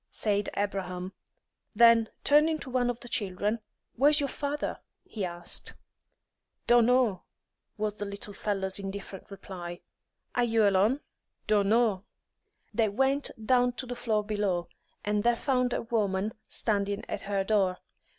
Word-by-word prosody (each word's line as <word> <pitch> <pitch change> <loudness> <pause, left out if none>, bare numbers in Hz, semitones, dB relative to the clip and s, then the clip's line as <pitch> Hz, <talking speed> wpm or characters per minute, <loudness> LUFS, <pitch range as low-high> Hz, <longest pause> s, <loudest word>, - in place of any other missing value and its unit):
said 205 -1 0
Abraham. 185 -2 -3 0.6
Then 230 -1 +6
turning 305 +2 +5
to 260 - -7
one 245 -1 +2
of 245 -1 -3
the 245 - -9
children, 205 0 -1 0.4
"Where's 290 +4 +5
your 280 -1 0
father?" 290 +1 -3 0.2
he 210 - -6
asked. 175 -1 -2 0.9
"Dono," 240 -4 +4 0.5
was 210 0 -2
the 205 - -3
little 200 +1 -6
fellow's 195 -2 -2
indifferent 195 0 -7
reply. 180 -3 -8 0.5
"Are 245 - +2
you 225 -3 +3
alone?" 205 +8 +3 0.4
"Dono." 210 -1 +3 0.7
They 220 -2 +2
went 270 +6 +1 0.2
down 245 +1 +3
to 255 - -5
the 245 0 -5
floor 220 -3 0
below, 205 -5 -1 0.4
and 210 0 +1
there 240 0 +4
found 250 -1 +1
a - - -1
woman 210 -3 0
standing 200 -2 -1
at - - -4
her 200 -1 -1
door. 195 -3 +2
210 Hz, 135 wpm, -29 LUFS, 195-245 Hz, 0.9 s, Then